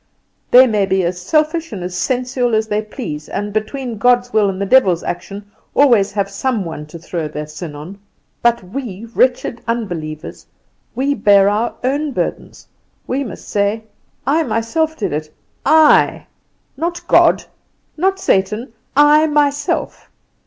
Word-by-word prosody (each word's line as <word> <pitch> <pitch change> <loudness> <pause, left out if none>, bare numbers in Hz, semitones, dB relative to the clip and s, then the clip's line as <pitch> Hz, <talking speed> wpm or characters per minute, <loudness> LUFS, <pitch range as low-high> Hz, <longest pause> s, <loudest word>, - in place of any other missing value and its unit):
They 255 +1 +8
may 210 -5 +1
be 190 -1 +1
as 180 +1 -2
selfish 310 - 0
and 195 -5 -6
as 180 0 -5
sensual 250 +2 0
as 220 0 0
they 210 0 0
please, 210 - -7
and, 205 0 -4
between 225 +1 -3
God's 245 +1 +2
will 210 -2 +3
and 190 -1 -4
the 200 - -1
devil's 190 -7 +4
action, 200 +3 -6 0.2
always 235 -8 +4
have 200 -1 0
some 205 +1 -2
one 150 -2 -7
to 160 - -10
throw 165 -1 -4
their 150 0 -6
sin 150 0 -8
on. 170 +7 -9 0.4
But 235 -2 +2
we, 215 0 -6
wretched 250 -2 +1
unbelievers, 175 -10 -5 0.5
we 275 +2 +1
bear 200 -4 +4
our 215 +3 -1
own 285 +3 -1
burdens: - - -4 0.4
we 270 +2 -1
must 220 -9 -9
say, 205 +2 0 0.4
'I 295 +5 +2
myself 315 +5 -1
did 205 - -2
it, 155 +1 -4 0.4
I. 315 -1 +5 0.5
Not 340 +4 -4
God, - - +4 0.5
not 385 +4 +1
Satan; 210 - 0 0.2
I 300 +2 +6
myself! 290 -1 -1
220 Hz, 150 wpm, -17 LUFS, 190-265 Hz, 0.5 s, They